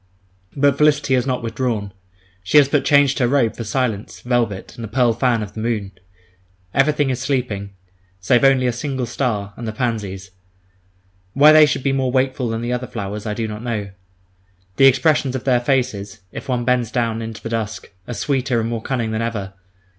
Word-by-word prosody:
But 140 0 +3
Felicity 150 -2 +3
has 130 0 +1
not 125 -2 -1
withdrawn; 115 -3 -2 0.5
she 95 +9 +3
has 145 -2 +7
but 145 0 +1
changed 145 -1 +3
her 125 - +3
robe 125 -3 +2
for 115 - -5
silence, 110 -2 -2
velvet, 120 -6 -1
and 115 - -8
the - - -4
pearl 120 +1 +2
fan 120 -1 +1
of 100 -1 -9
the 110 - -7
moon. 110 -3 -2 0.8
Everything 145 0 +2
is 130 - -2
sleeping, 120 -7 -2 0.4
save 120 +8 +2
only 135 -2 +4
a 125 - +2
single 130 0 -3
star, 110 -5 -2
and 115 - -7
the - - -2
pansies. 105 -5 -3 1.0
Why 145 +3 +7
they 155 -1 +7
should 135 - -2
be 135 0 +1
more 130 -2 0
wakeful 130 -1 0
than 115 0 -3
the 120 +1 -2
other 125 +1 -3
flowers, 105 -1 -5
I 105 - -2
do 115 0 -2
not 105 0 -6
know. 110 -4 -3 0.9
The 135 - +7
expressions 135 0 +2
of 130 - -4
their 125 -2 +3
faces, 120 -6 -1
if - - -8
one 120 -2 -1
bends 125 -2 +1
down 115 -2 -1
into 110 -1 -7
the 115 - -4
dusk, 110 -4 -4 0.2
are 120 - -5
sweeter 135 -3 0
and 115 - -1
more 115 -1 -3
cunning 115 -3 -2
than 110 +1 -2
ever. 105 -5 -3
120 Hz, 195 wpm, -20 LUFS, 110-130 Hz, 1.0 s, has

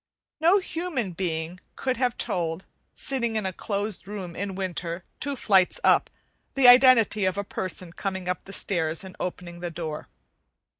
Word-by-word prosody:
No 340 +5 +5
human 325 - -3
being 170 0 -3 0.2
could 255 -2 -1
have 245 -1 0
told, 165 0 -2 0.3
sitting 235 -4 0
in 215 -2 -1
a 190 - -2
closed 205 0 -3
room 190 -4 -6
in 195 0 -4
winter, 180 -2 -3 0.2
two 285 0 -2
flights 190 -7 +3
up, - - +4 0.5
the 270 -2 +6
identity 245 -5 +7
of 185 +1 0
a 200 - -1
person 185 -3 -5
coming 190 -2 -4
up 180 0 -2
the 195 - -10
steps 165 -4 0
and 190 -1 -10
opening 175 -1 -5
the 175 0 -4
door. 160 -2 -5
190 Hz, 160 wpm, -26 LUFS, 175-235 Hz, 0.5 s, identity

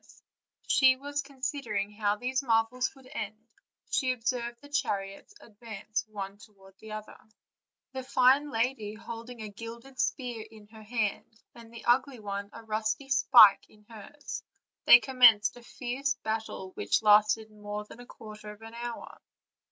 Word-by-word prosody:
As - - -21 0.4
she 260 -1 +5
was 285 +2 -4
considering 265 -7 -3
how 210 -1 0
these 255 +4 -1
marvels 235 0 +1
would 265 -1 -18
end, 215 0 -5 0.5
she 260 -2 +2
observed 240 0 -3
the 285 - -14
chariots 200 - -3
advance 215 0 -6
one 200 -1 -7
toward 200 -3 -17
the 220 - -11
other; 215 0 -8
and 220 - -29 0.6
the 260 - -4
fine 260 +3 +3
lady 225 -3 -1
holding 230 +1 -8
a 215 - -6
gilded 235 +5 -10
spear 245 -5 -2
in 215 -1 -15
her 220 0 -13
hand, 220 0 -3
and 230 -1 -14
the 235 - -11
ugly 250 +1 +2
one 200 -1 -5
a 230 - -11
rusty 220 +5 -2 0.2
pike 215 -6 +8
in 210 0 -22
hers, 230 +7 -8 0.4
they 240 - +10
commenced 240 -3 +5
a 245 - -12
fierce 260 +3 -3
combat 220 -4 -4
which - - 0
lasted 215 +1 +4
more 210 0 -6
than 220 - -14
a 245 - -12
quarter 215 -1 -11
of 210 +1 -14
an 225 0 -10
hour. 235 0 -7
225 Hz, 160 wpm, -29 LUFS, 210-250 Hz, 0.6 s, they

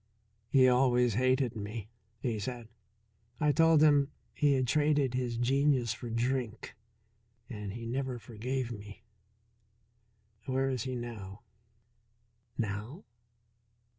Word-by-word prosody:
"He 130 -2 +6
always 125 -2 +3
hated 130 +1 +2
me," 105 0 -5 0.3
he 115 -4 -2
said. 120 +1 -5 0.7
"I 150 -1 +3
told 165 0 +5
him 145 -2 +5 0.2
he 145 -2 +3
had 130 -1 +2
traded 145 -1 +2
his 125 -2 -1
genius 130 -1 +2
for 115 +1 -7
drink, 120 0 -2 0.8
and 105 -3 -5
he 115 +1 -7
never 130 +1 -2
forgave 120 +2 -4
me. 105 0 -9 1.4
Where 135 0 +1
is 125 -3 -2
he 130 -1 -3
now?" 115 -3 -7 1.1
"Now?" 110 - -4
125 Hz, 110 wpm, -31 LUFS, 115-135 Hz, 1.4 s, He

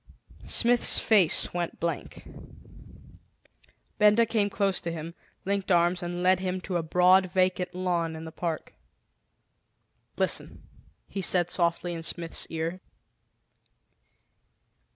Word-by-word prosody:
Smith's 240 0 +2
face 200 -8 +3
went 175 -1 -4
blank. 170 0 -5 1.7
Benda 210 +2 +5
came 215 -2 0
close 195 -2 0
to 170 - -4
him, 165 0 -7 0.3
linked 200 0 -2
arms 175 +1 +2
and 175 0 -4
led 185 0 +4
him 185 0 -3
to 180 - -5
a - - -1
broad 180 +3 +4
vacant 180 0 -1
lawn 175 -3 -2
in 160 0 -8
the 160 - -8
park. 165 -1 -5 1.4
"Listen!" - - +1 0.4
he 195 - -5
said 175 -1 +2
softly 175 0 0
in 165 - -6
Smith's 165 0 -2
ear. 165 +3 -4
180 Hz, 115 wpm, -27 LUFS, 170-190 Hz, 1.7 s, Benda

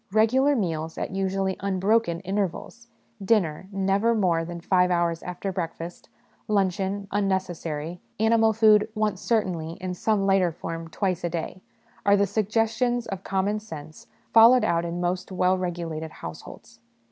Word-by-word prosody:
Regular 255 +7 +3
meals 165 -7 -2
at, - - -3
usually, 190 0 -1
unbroken 195 -1 +1
intervals 200 +4 -3 0.4
dinner, 190 -5 +1
never 195 +4 +1
more 175 -6 +2
than 170 +1 -6
five 180 +1 +2
hours 170 -2 0
after 180 +2 -4
breakfast; 170 -1 -6 0.4
luncheon, 195 0 0
un 205 0 +1
necessary; 175 -3 -3 0.2
animal 220 0 +4
food, 215 -1 +4
once 210 -3 -1
certainly, 180 -8 -1
in 180 +1 -5
some 200 +2 0
lighter 195 -3 +3
form, 165 0 -6
twice 180 +1 -2
a 175 - 0
day 170 +2 -5 0.4
are 200 0 +5
the 200 - +3
suggestions 225 +4 0
of 195 -3 -6
common 195 +2 0
sense 155 -7 -10 0.3
followed 230 +3 +7
out 170 0 +1
in 170 +1 -4
most 180 +2 -2
well 185 0 +2
regulated 170 -3 -4
households. 80 - -10
190 Hz, 145 wpm, -25 LUFS, 170-210 Hz, 0.4 s, followed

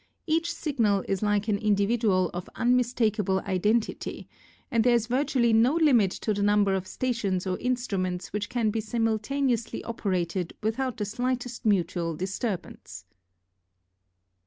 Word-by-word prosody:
Each 330 +1 +1
signal 225 - 0
is 195 -1 -1
like 210 0 +1
an 205 -2 +1
individual 205 -3 +2
of 175 +1 -6
unmistakable 230 -5 +1
identity 210 +3 -1 0.4
and 230 -3 +3
there 245 0 +4
is 230 -2 +1
virtually 245 -1 +1
no 235 +7 +4
limit 265 - +4 0.2
to 215 - +2
the 205 - -2
number 205 -1 +3
of 190 -1 -2
stations 205 -8 -1
or 185 -1 -1
instruments 195 -9 -2
which 205 0 -2
can 230 -3 0
be 220 +1 -1
simultaneously 230 +3 -1
operated 185 -5 -2
without 250 +3 -1
the 210 - -2
slightest 245 +1 -3
mutual 175 -4 +1
disturbance. 185 - -5
215 Hz, 135 wpm, -27 LUFS, 195-240 Hz, 0.4 s, there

